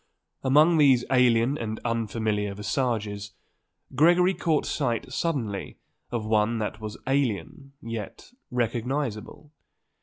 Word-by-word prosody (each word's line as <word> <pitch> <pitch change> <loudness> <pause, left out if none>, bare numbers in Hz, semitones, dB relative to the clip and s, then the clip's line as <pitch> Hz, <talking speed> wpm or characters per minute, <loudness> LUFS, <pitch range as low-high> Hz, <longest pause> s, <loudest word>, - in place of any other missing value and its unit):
Among 155 +5 +5
these 135 -4 +5
alien 125 +1 +3
and 110 -1 -4
unfamiliar 110 -3 -1
visages, 105 -2 -2 0.6
Gregory 175 +6 +4
caught 160 -4 0
sight 125 -3 -2
suddenly 130 - -2 0.3
of 115 -3 -3
one 110 +1 +2
that 110 0 -4
was 110 -1 -6
alien 135 - -2
yet 115 - -7 0.2
recognizable. 125 +3 -3
120 Hz, 100 wpm, -26 LUFS, 110-140 Hz, 0.6 s, Among